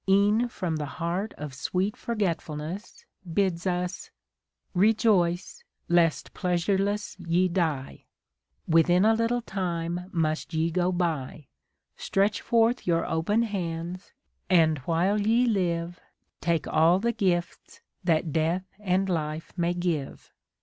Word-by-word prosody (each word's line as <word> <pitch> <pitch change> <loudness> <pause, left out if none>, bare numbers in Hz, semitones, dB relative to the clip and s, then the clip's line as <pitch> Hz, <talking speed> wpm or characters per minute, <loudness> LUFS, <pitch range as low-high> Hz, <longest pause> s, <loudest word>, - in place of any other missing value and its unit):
E'en 205 +5 +4
from 180 -8 -3
the 150 -1 -3
heart 180 +5 -2
of 150 -2 -6
sweet 185 +9 -1
Forgetfulness, 175 -4 -4 0.3
Bids 185 0 0
us, 180 0 -2 0.6
Rejoice, 190 -3 +2 0.3
lest 170 -2 +2
pleasureless 195 +3 0
ye 175 +1 +2
die. 155 - -2 0.6
Within 175 +4 +4
a 220 - +5
little 230 +2 0
time 175 -3 -3
must 160 0 -1
ye 160 +1 +1
go 180 +1 +1
by. 160 -5 -2 0.5
Stretch 200 +2 +1
forth 230 0 +2
your 165 -1 +2
open 190 +8 +1
hands, 180 -3 -4 0.4
and 160 -5 +4
while 175 +9 +1
ye 230 +4 +3
live 175 -5 -1 0.4
Take 170 -2 0
all 165 +3 +4
the 235 +4 0
gifts 180 -6 -2 0.2
that 165 -3 +1
Death 165 +4 0
and 190 -1 +1
Life 155 -3 -3
may 175 -1 0
give!" 170 -6 -3
175 Hz, 120 wpm, -27 LUFS, 165-200 Hz, 0.6 s, a